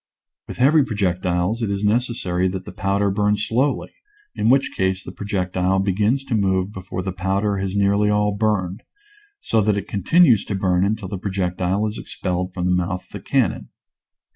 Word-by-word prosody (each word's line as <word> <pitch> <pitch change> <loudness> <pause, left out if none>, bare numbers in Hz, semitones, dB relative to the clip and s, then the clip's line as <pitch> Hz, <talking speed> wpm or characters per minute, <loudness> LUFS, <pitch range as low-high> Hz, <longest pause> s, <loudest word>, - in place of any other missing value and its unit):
With - - -7
heavy 145 +5 +5
projectiles 95 -2 -1
it 110 - -1
is 100 0 -2
necessary 105 -5 0
that 95 0 -4
the - - -8
powder 100 0 0
burn 105 +1 +1
slowly, 125 +6 0 0.4
in 110 - 0
which 135 +1 +3
case 95 0 0
the - - -8
projectile 95 -2 -1
begins 105 +7 +1
to 135 - -4
move 95 -2 +1
be 95 - -7
fore 90 0 -5
the 95 - -3
powder 95 +2 -1
has 95 0 -3
nearly 100 +1 +2
all 105 0 +2
burned, 100 -3 -1 0.6
so 110 - +1
that 105 0 +1
it 100 0 -4
continues 115 - +4
to 100 - -3
burn 95 -1 +1
until 105 0 -1
the 95 0 -5
projectile 95 0 -1
is 110 +1 -4
ex - - -7
pelled 90 0 -2
from 90 -1 -3
the 90 - +2
mouth 90 +1 -1
of - - -25
the - - -6
cannon. - - 0
100 Hz, 190 wpm, -21 LUFS, 95-105 Hz, 0.6 s, heavy